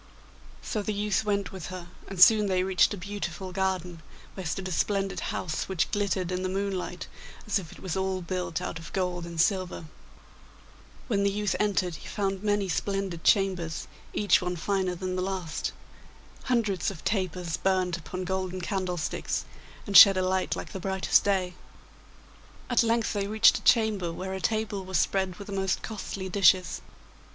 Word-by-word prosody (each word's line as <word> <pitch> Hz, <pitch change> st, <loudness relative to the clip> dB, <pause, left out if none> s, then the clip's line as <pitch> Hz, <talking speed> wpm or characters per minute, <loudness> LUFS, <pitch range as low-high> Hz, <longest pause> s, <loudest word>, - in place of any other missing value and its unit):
So 215 Hz, -, -2 dB
the 210 Hz, 0 st, -3 dB
youth 210 Hz, 0 st, 0 dB
went 200 Hz, -4 st, 0 dB
with 190 Hz, -4 st, -7 dB
her, 185 Hz, -1 st, -7 dB, 0.2 s
and 195 Hz, -2 st, -7 dB
soon 210 Hz, +2 st, +7 dB
they 185 Hz, -1 st, +1 dB
reached 190 Hz, 0 st, +3 dB
a 205 Hz, -, -3 dB
beautiful 185 Hz, -2 st, -5 dB
garden, 180 Hz, -3 st, -2 dB, 0.3 s
where 190 Hz, -3 st, -5 dB
stood 185 Hz, +4 st, -3 dB
a -, -, -5 dB
splendid 195 Hz, +1 st, 0 dB
house, 160 Hz, +1 st, -3 dB
which 175 Hz, -3 st, 0 dB
glittered 195 Hz, -3 st, 0 dB
in 180 Hz, 0 st, -1 dB
the 185 Hz, -, -1 dB
moonlight 190 Hz, -2 st, -3 dB, 0.4 s
as 210 Hz, -1 st, +1 dB
if 170 Hz, -4 st, -10 dB
it -, -, -13 dB
was 185 Hz, -4 st, -4 dB
all 190 Hz, 0 st, -1 dB
built 180 Hz, -1 st, -3 dB
out 165 Hz, -, -4 dB
of 165 Hz, -, -10 dB
gold 180 Hz, -2 st, -2 dB
and 170 Hz, -1 st, -7 dB
silver. 185 Hz, -1 st, +1 dB, 1.2 s
When 205 Hz, -5 st, +1 dB
the 200 Hz, -, +3 dB
youth 205 Hz, 0 st, -1 dB
entered 185 Hz, -5 st, 0 dB
he -, -, -11 dB
found 195 Hz, -2 st, -2 dB
many 205 Hz, -1 st, +1 dB
splendid 190 Hz, -1 st, -2 dB
chambers, 185 Hz, -5 st, +1 dB, 0.2 s
each 205 Hz, -3 st, +3 dB
one 180 Hz, 0 st, -2 dB
finer 185 Hz, +1 st, -1 dB
than 185 Hz, +1 st, -3 dB
the 185 Hz, -, -1 dB
last. 185 Hz, -4 st, -3 dB, 0.7 s
Hundreds 220 Hz, -7 st, +1 dB
of 190 Hz, -5 st, -9 dB
tapers 180 Hz, -4 st, -1 dB
burnt 185 Hz, -2 st, +1 dB
upon 180 Hz, +2 st, -6 dB
golden 185 Hz, 0 st, -2 dB
candlesticks, 180 Hz, -2 st, -2 dB, 0.4 s
and 200 Hz, -, -4 dB
shed 195 Hz, -1 st, +11 dB
a 185 Hz, -, +1 dB
light 185 Hz, 0 st, 0 dB
like -, -, -7 dB
the 190 Hz, -, -5 dB
brightest 190 Hz, 0 st, +2 dB
day. 190 Hz, -3 st, 0 dB, 1.2 s
At 245 Hz, -, +5 dB
length 230 Hz, -1 st, +1 dB
they 200 Hz, -1 st, -1 dB
reached 220 Hz, +2 st, +5 dB
a -, -, -17 dB
chamber 215 Hz, -7 st, +3 dB
where 190 Hz, +3 st, -5 dB
a 190 Hz, -, -4 dB
table 215 Hz, -2 st, -1 dB
was 185 Hz, -1 st, -1 dB
spread 190 Hz, +2 st, +1 dB
with 200 Hz, -, -9 dB
the 200 Hz, -, -7 dB
most 190 Hz, -1 st, -1 dB
costly 195 Hz, -3 st, -5 dB
dishes. 185 Hz, -1 st, +3 dB
190 Hz, 175 wpm, -28 LUFS, 180-200 Hz, 1.2 s, shed